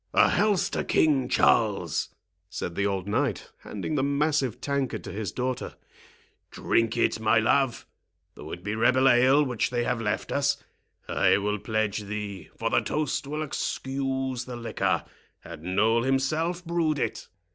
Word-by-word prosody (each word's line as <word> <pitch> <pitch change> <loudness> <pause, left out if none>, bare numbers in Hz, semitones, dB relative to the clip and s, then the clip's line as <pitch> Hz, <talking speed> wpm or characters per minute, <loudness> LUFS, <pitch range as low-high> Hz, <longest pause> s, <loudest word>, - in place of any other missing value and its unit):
"A - - +6
health 205 -3 +2
to - - -1
King 145 -5 +2
Charles!" 100 -8 +2 0.4
said 85 - -4
the 100 +3 0
old 95 -1 -2
knight, 115 0 -1
handing 105 +9 -5
the 145 - +1
massive 140 -3 0
tankard 140 -2 -2
to - - -7
his 100 -1 -4
daughter; 125 0 -3 0.7
"drink 115 0 0
it, 115 - +1
my 110 0 +3
love, 120 +3 +2 0.5
though - - -10
it 90 - -7
be 105 +1 -2
rebel 130 +4 +3
ale 130 +3 +5
which 125 -4 -1
they 120 -1 -1
have 120 -1 -1
left 105 -2 -2
us. 140 0 +1 0.5
I - - +3
will 105 +1 -1
pledge 110 -1 -1
thee; 100 -4 -6
for - - -1
the - - +3
toast 150 -2 -2
will 150 +2 -3
excuse 135 -3 -2
the 125 - -7
liquor, 115 -1 -1 0.4
had 85 -2 -10
Noll 105 +7 +2
himself 155 +7 0
brewed 165 -3 0
it." - - -3
125 Hz, 155 wpm, -26 LUFS, 105-140 Hz, 0.7 s, A